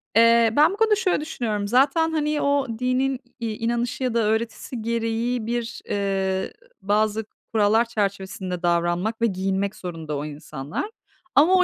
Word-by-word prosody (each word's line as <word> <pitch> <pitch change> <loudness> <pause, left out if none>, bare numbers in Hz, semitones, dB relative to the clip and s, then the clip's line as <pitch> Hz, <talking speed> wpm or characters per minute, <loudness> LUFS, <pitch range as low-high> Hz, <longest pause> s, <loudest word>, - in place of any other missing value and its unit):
Eee, 230 0 +6
ben 300 +3 +6
bu - - -6
konuda 440 0 +4
şöyle 400 -7 +1
düşünüyorum 220 -9 -2
zaten, 275 +8 +3
hani, 300 -1 0
o 280 -1 +2
dinin, 255 +1 +1 0.2
iii, 225 -2 -3
inanışı 235 +3 -1
ya 250 -2 0
da 230 -1 +2
öğretisi 225 +2 -2
gereği 230 +1 -1
bir, 235 0 -3
eee, 195 -1 -1 0.3
bazı 215 +2 +1 0.3
kurallar 220 +2 +4
çerçevesinde 195 -4 -3
davranmak 175 +6 +1
ve - - +4
giyinmek 195 +1 -1
zorunda 165 -6 -5
o 145 - -4
insanlar. 145 - -5 0.5
Ama 315 +6 +6
o 365 - +6
225 Hz, 150 wpm, -24 LUFS, 195-255 Hz, 0.5 s, Eee